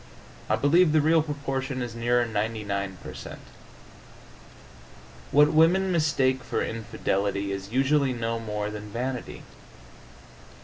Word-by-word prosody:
I - - +3
believe 155 +3 +4
the 155 - +5
real 160 +2 +4
proportion 135 -3 -3
is 120 -2 -6
nearer 120 +1 +1
99 105 -3 -3
per - - -8
cent. - - -9 1.9
What 150 +1 +5
women 180 +5 +4
mistake 135 -6 +1
for - - -2
infidelity 100 -3 -2
is 100 +1 -5
usually 135 +2 +2
no 115 -1 -2
more 105 -2 -3
than 105 0 -7
vanity. 125 +3 -5
125 Hz, 120 wpm, -26 LUFS, 105-145 Hz, 1.9 s, the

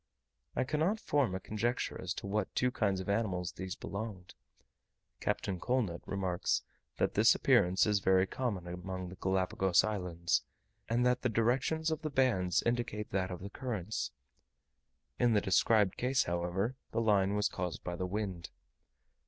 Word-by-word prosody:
I - - +2
cannot 155 - 0
form 140 - +1
a - - -2
conjecture 115 +5 -2
as 90 - -4
to - - -6
what 100 0 -2
two 125 0 +2
kinds 100 -5 0
of 95 - -8
animals 95 -5 0
these 95 0 -5
belonged. 100 -3 -6 0.9
Captain 95 -3 -1
Colnett 115 -8 0
remarks, 95 -2 0 0.3
that - - +1
this - - +6
appearance 90 +2 +4
is 105 -2 +2
very 95 -1 +4
common 100 -5 -3
among 90 +1 -5
the 95 - -9
Galapagos 95 -1 +2
Islands, 90 -5 0 0.5
and 120 +2 +2
that 125 0 +2
the 125 - +1
directions 130 +8 +1
of 160 0 -2
the 155 - -2
bands 120 -11 +2
indicate 115 -3 -1
that 95 -1 0
of 90 -1 -6
the 100 +1 -7
currents; 110 - -3 1.1
in 120 -2 +4
the 105 - +5
described 100 +1 +3
case, 130 +1 +2
however, 90 +7 -1
the - - -1
line 100 -3 +3
was 105 0 +2
caused 90 -2 -4
by 90 - -3
the 90 +1 -2
wind. 95 -3 -3
100 Hz, 160 wpm, -33 LUFS, 90-120 Hz, 1.1 s, this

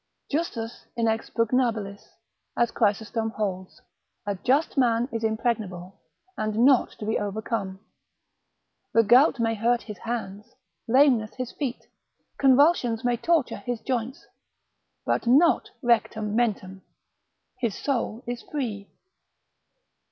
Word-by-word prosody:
Justus 240 -7 -3
inexpugnabilis, 225 -2 0 0.6
as 235 -1 +2
Chrysostom 220 +1 0
holds, 195 +3 -4 0.4
a 205 - -1
just 265 - +1
man 240 -3 +2
is 230 -1 -3
impregnable, 215 -5 -2 0.3
and 215 0 -2
not 270 -3 +4
to 210 - -8
be 220 - 0
overcome. 205 -1 -3 1.2
The 230 - +6
gout 245 +5 +5
may 225 -1 +1
hurt 235 +2 +1
his 210 -3 -9
hands, 215 -4 -6 0.3
lameness 250 -3 +3
his 255 -2 -5
feet, 265 -5 -4 0.5
convulsions 265 -4 +4
may 245 0 +2
torture 320 +2 +1
his 245 -2 -4
joints, 250 0 -3 0.8
but - - 0
not 295 +8 +4
rectam 220 -3 +1
mentem 195 -5 -1 0.8
his 230 -6 -1
soul 245 -3 -2
is 240 0 -4
free. 220 -9 -5
230 Hz, 110 wpm, -25 LUFS, 215-250 Hz, 1.2 s, The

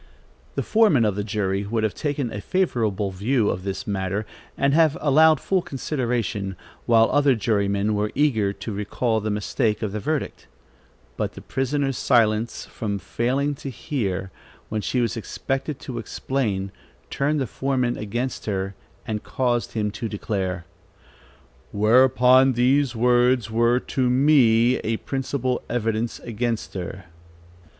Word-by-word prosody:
The - - -1
foreman 210 - +4
of 105 - +1
the 105 - -2
jury 100 -2 -1
would 110 +2 -1
have 110 - 0
taken 145 -5 -2
a 105 - -5
favorable 110 - 0
view 105 +4 +1
of 90 - -4
this 95 0 -4
matter, 100 +1 -2 0.3
and 140 0 +2
have 160 0 +4
allowed 155 +1 +5
full 190 -2 +1
consideration, 120 - -2 0.3
while 115 -1 +5
other 145 -2 +4
jurymen 100 -1 0
were 105 0 -1
eager 115 -9 +2
to 110 - -7
recall 110 +3 -1
the 110 - -2
mistake 105 +1 -1
of 105 - -2
the 105 - -3
verdict; 150 +6 -3 0.7
but - - -2
the - - -10
prisoner's 135 0 -1
silence 115 -2 +2
from 105 -2 -4
failing 130 - -1
to 140 0 -7
hear, 100 -9 -3 0.4
when 110 0 -2
she 125 +4 0
was 120 0 0
expected 135 +5 -3
to 120 -2 -5
explain, 110 -5 -2 0.4
turned 145 +2 0
the 135 - 0
foreman 125 0 -1
against 120 +5 -4
her, 95 -1 -2 0.3
and 105 -1 -3
caused 120 -2 -1
him 105 -2 -1
to 115 +2 -5
declare: 95 -5 -3 1.1
"Whereupon 130 +4 +5
these 130 +2 +2
words 120 -1 +3
were 120 +2 +3
to 130 -1 -1
me 125 -3 +4
a 115 0 -2
principal 130 -1 -2
evidence 115 -1 -1
against 115 -1 -3
her." 95 0 -6
115 Hz, 140 wpm, -23 LUFS, 105-135 Hz, 1.1 s, allowed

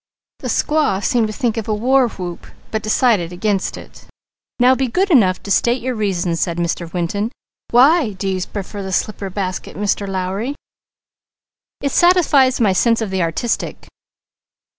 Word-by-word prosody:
The - - -5
squaw 295 -11 +1
seemed 240 -5 +2
to 215 - -6
think 235 -2 -1
of 220 - -3
a 215 - 0
war 255 +4 +3
whoop, 180 -4 -7 0.2
but 220 - -1
decided 215 -5 +2
against 195 +2 -1
it. - - -14 0.5
"Now 250 +1 +6
be 260 0 0
good 375 +10 0
enough 190 - +4
to 200 - -5
state 240 +5 +2
your 255 +1 -3
reasons," 180 -6 -1
said 170 -2 -1
Mr. 170 0 -2
Winton. 200 +5 -2 0.4
"Why 260 0 +4
do 195 +1 -4
you 190 -1 -1
prefer 200 +2 -6
the 190 -1 -5
slipper 200 0 -2
basket, 185 -1 -4
Mr. 200 0 -1
Lowry?" 195 +7 -3 1.3
"It 280 - -1
satisfies 310 -8 +4
my 210 -5 +3
sense 230 +4 +2
of 220 -4 -3
the 190 -1 0
artistic." 170 +8 -2
210 Hz, 160 wpm, -18 LUFS, 185-250 Hz, 1.3 s, Now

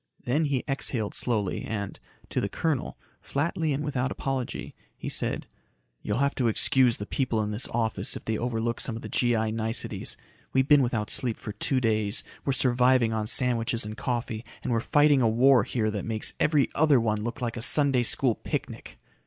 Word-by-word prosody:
Then 145 +6 +1
he 140 -4 0
exhaled 125 -6 -2
slowly 105 -6 -1
and, 100 -3 -4 0.3
to - - -1
the 100 - -1
colonel, 155 +3 -2 0.2
flatly 160 +2 -1
and 140 +2 -1
without 135 -3 -1
apology, 135 -2 -3 0.2
he - - -5
said, - - -1 0.6
"You'll 105 - -2
have 140 +2 +2
to 125 - +2
excuse 125 +2 +4
the 105 - -5
people 120 -1 -1
in 105 - -3
this 105 +4 -2
office 115 -1 -1
if - - -8
they 110 - -1
overlook 115 0 -2
some 115 - -2
of 115 - -7
the - - -6
G.I. 115 -3 +1
niceties. 110 0 -2 0.4
We've 130 0 +3
been 145 -1 +6
without 120 -4 -1
sleep 120 -4 0
for 105 - -6
two 130 +5 0
days, 110 -3 +1 0.2
we're 135 - 0
surviving 125 -2 +3
on 110 -1 -1
sandwiches 115 -2 +1
and 105 +1 -6
coffee, 120 -1 -3 0.2
and - - -2
we're 115 - +2
fighting 145 +3 +4
a 115 - +4
war 125 +2 +5
here 110 -3 -1
that 105 -2 -3
makes 110 -2 0
every 150 -3 +3
other 150 -4 +4
one 110 -2 0
look 120 +5 -4
like 120 -3 -3
a 115 - -5
Sunday 140 0 +3
School 120 +1 +2
picnic." - - -5
120 Hz, 190 wpm, -27 LUFS, 110-135 Hz, 0.6 s, been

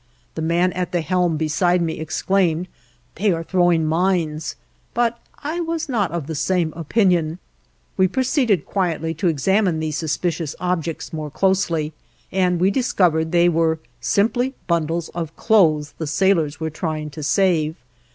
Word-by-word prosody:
The 160 - -5
man 170 +3 +1
at 180 -1 -3
the 175 -2 0
helm 175 0 +1
beside 175 +4 +2
me 165 -2 -2
exclaimed: 170 +2 0 0.5
"They 200 +7 +1
are 165 0 -3
throwing 175 -2 +2
mines," 160 -2 0 0.4
but 235 0 +1 0.2
I 315 +4 -2
was 330 -1 -2
not 220 - 0
of 170 -4 -4
the 160 - -5
same 165 +1 0
opinion. 170 -1 +1 0.6
We 190 -1 +4
proceeded 245 - +1
quietly 165 -4 -1
to 165 +4 -1
examine 175 +3 +2
these 155 -2 -2
suspicious 160 -1 -2
objects 170 -3 -2
more 155 -1 -4
closely, 165 -3 0 0.4
and 180 -2 +1
we 185 +3 +3
discovered 175 -9 +1
they 175 0 +4
were 165 -1 +2 0.2
simply 245 +6 +1
bundles 170 -1 -1
of 165 -2 -5
clothes 155 -9 +3
the 160 - -3
sailors 165 -2 +1
were 160 -1 -3
trying 155 -1 -4
to 155 - -8
save. 160 -1 +2
170 Hz, 150 wpm, -21 LUFS, 160-190 Hz, 0.6 s, We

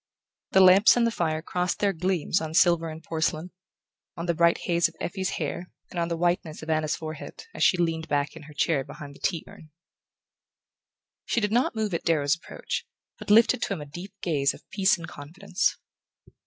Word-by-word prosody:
The 190 - +7
lamps 190 +5 +7
and 240 - +3
the 230 - +1
fire 160 -6 -1
crossed 180 0 -1
their 200 -1 +1
gleams 180 0 0
on 160 0 -5
silver 170 -2 +4
and 160 0 -9
porcelain, 160 +1 -2 0.7
on 170 - -4
the 170 - +1
bright 170 +1 +3
haze 170 -1 +3
of - - -16
Effie's 190 +1 -3
hair 170 +3 -4 0.2
and 175 - -4
on 170 - 0
the 170 -1 -2
whiteness 175 -2 -1
of 160 - -3
Anna's 155 -1 +1
forehead, 155 - -8
as - - -1
she 185 - +5
leaned 165 -2 -1
back 145 +1 -1
in 165 - -10
her - - -12
chair 145 -4 +1
behind 140 +1 -10
the - - -17
tea 170 -4 -1
urn. 155 - -14 1.6
She - - +1
did 210 -2 -1
not 240 +1 +2
move 215 -3 -1
at 170 - -2
Darrow's 150 -4 +2
approach, 165 - -5 0.3
but - - -9
lifted 230 +3 +5
to 210 - -1
him 170 - -5
a - - -6
deep 175 +7 -9
gaze 140 -5 +1
of - - -18
peace 195 -1 +3
and 170 0 -8
confidence. 180 +7 -2
170 Hz, 200 wpm, -26 LUFS, 155-190 Hz, 1.6 s, The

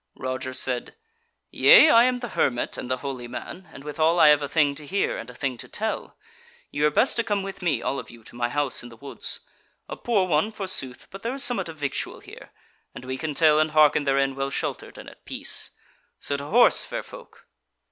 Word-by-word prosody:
Roger 130 0 -4
said: 125 -1 -2 0.6
"Yea, 320 -11 +7
I 230 +1 +7
am 250 -1 0
the 245 - -5
hermit 120 -9 0
and 125 - -6
the 130 - 0
holy 130 -3 -5
man; 175 +8 -8
and 140 - -12
withal 155 +3 +1
I 150 - +8
have 150 0 +5
a 145 - -4
thing 150 -2 +2
to 150 +1 -7
hear 200 +4 0
and 115 - -7
a 125 - -12
thing 130 -2 -3
to - - -9
tell. 220 +1 -4 0.5
Ye 145 - -4
were 150 - +5
best 225 - +2
to 235 - +2
come 205 -3 -1
with 195 0 -7
me, 155 -9 0
all 140 - -1
of - - -9
you, 115 -1 -15
to 120 - -15
my 120 0 -1
house 145 -1 0
in 120 - -10
the 115 - -15
woods; 140 +4 -4 0.5
a - - -6
poor 215 -6 +1
one, 175 +5 +1
forsooth, 185 - -2
but 195 - -9
there 235 +3 -3
is 275 - +1
somewhat 245 -10 +1
of 160 - -9
victual 145 -2 -4
here, - - -13 0.5
and - - -9
we 130 0 -4
can 150 +2 -4
tell 155 -1 +5
and 155 0 +2
hearken 150 -1 +5
therein 135 0 +1
well 135 0 -2
sheltered - - -5
and - - -11
at - - -14
peace. - - -3 0.5
So 140 - -2
to 140 0 -5
horse, 235 +11 +5
fair - - -5
folk." - - -14
150 Hz, 230 wpm, -24 LUFS, 130-190 Hz, 0.6 s, I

